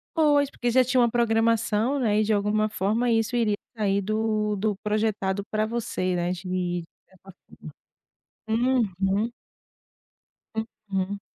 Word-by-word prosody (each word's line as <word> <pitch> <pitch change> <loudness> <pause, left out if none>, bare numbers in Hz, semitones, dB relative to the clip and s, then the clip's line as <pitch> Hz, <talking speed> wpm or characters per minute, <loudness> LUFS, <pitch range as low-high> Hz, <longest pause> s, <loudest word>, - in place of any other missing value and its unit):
Pois, 290 -3 +3
porque 245 - -2
já 255 +2 +5
tinha 255 +1 +1
uma 240 -1 +4
programação, 230 +1 +2
né, 215 -5 +2
e - - +3
de 215 +1 +1
alguma 210 +1 +1
forma 215 +4 0
isso 225 +1 +1
iria 220 -3 +2 0.2
sair 200 -1 +1
do 215 0 0
do 210 0 0
projetado 210 -2 0
para 215 0 0
você 220 -5 -2
né 175 0 0
de 180 -1 -3 0.2
certa 190 +1 -16 1.2
forma, 235 -1 +2
uhum. 200 +4 +1 1.6
Uhum. 195 +1 -2
215 Hz, 130 wpm, -25 LUFS, 200-235 Hz, 1.6 s, já